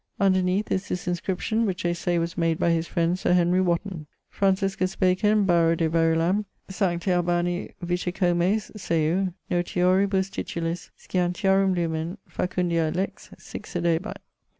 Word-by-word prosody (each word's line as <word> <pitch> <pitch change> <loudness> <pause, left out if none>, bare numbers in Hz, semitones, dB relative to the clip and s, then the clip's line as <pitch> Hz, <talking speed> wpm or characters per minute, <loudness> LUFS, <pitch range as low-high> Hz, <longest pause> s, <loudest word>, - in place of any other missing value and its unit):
Underneath 185 0 +2
is 190 +1 -1
this 180 0 -4
inscription 190 +5 -1
which 185 -2 -3
they 175 0 +1
say 175 0 -1
was 170 +1 -2
made 165 -2 +1
by 170 - +2
his 165 0 0
friend 170 +2 0
Sir 180 - +2
Henry 180 +1 +3
Wotton. 175 -2 -1 0.2
Franciscus 195 -1 0
Bacon, 200 +3 +3
Baro 170 -2 +3
de 165 -1 +1
Verulam, 165 +5 +2 0.2
Sti 190 -3 0
Albani 175 -1 0
Vicecomes, 180 +3 0
seu, 170 0 0 0.2
notioribus 185 +2 +1
titulis, 165 0 -4
Scientiarum 190 +1 +1
Lumen, 165 0 -2
Facundiae 175 -3 0
Lex, 190 +2 -3
sic - - -9
sedebat. 170 +3 -1
180 Hz, 130 wpm, -25 LUFS, 170-190 Hz, 0.2 s, Henry